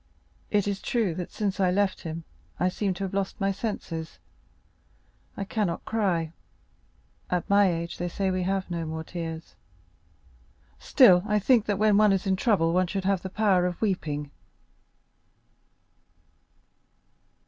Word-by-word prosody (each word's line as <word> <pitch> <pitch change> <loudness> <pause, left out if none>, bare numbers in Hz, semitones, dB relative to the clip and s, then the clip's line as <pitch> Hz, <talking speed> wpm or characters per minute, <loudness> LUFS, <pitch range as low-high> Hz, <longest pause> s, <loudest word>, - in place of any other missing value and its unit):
It 205 -1 +1
is 200 -1 -2
true 225 -8 0
that 175 +1 -5
since 200 -3 -2
I 185 -2 +3
left 195 +1 +1
him, 165 0 -6 0.4
I 180 - +2
seem 190 0 -2
to 195 - -5
have 195 - -4
lost 195 -1 -2
my 195 0 +1
senses. 185 -6 -5 1.2
I 200 - -2
cannot 195 -3 -2
cry; 180 -8 0 1.0
at 180 -1 -1
my 200 -2 +4
age 170 0 -4
they 175 - -1
say 190 +2 -1
that - - -1
we 185 - -1
have 190 0 -2
no 170 -1 -2
more 160 0 -4
tears,—still 90 - -1
I 210 -1 +2
think 220 +2 +3
that 205 -2 0
when 210 0 +4
one 210 -1 +5
is 190 0 -1
in 190 -1 +2
trouble 185 -5 +2
one 185 0 +2
should 195 +1 -3
have 195 -2 +1
the 190 - -5
power 190 -3 +2
of 180 - -5
weeping. 150 -8 -2
185 Hz, 150 wpm, -26 LUFS, 165-200 Hz, 1.2 s, one